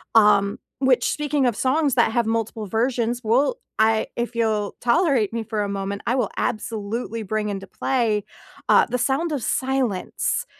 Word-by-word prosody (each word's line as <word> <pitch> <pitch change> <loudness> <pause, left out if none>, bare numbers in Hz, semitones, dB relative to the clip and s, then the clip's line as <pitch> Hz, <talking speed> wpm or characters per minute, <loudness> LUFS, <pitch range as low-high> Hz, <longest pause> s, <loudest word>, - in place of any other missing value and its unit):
um, 205 -2 +5 0.2
which 260 -2 +3
speaking 295 -2 0
of 240 - +1
songs 275 0 +1
that 235 -2 +3
have 235 0 +1
multiple 225 -1 -2
versions, 235 +2 0
well, 265 - +2 0.2
I 220 0 +3
if 235 0 -3
you'll 215 -3 0
tolerate 250 - +2
me 230 -1 -2
for 220 -1 -3
a 200 - -3
moment, 200 0 -3
I 245 - +2
will 255 - 0
absolutely 225 0 -3
bring 215 +1 -2
into 195 -1 -4
play, 225 -6 0 0.5
uh, - - +6
The 250 - -2
Sound 270 +7 0
of 280 - -2
Silence. 260 -7 -1
230 Hz, 165 wpm, -23 LUFS, 215-260 Hz, 0.5 s, uh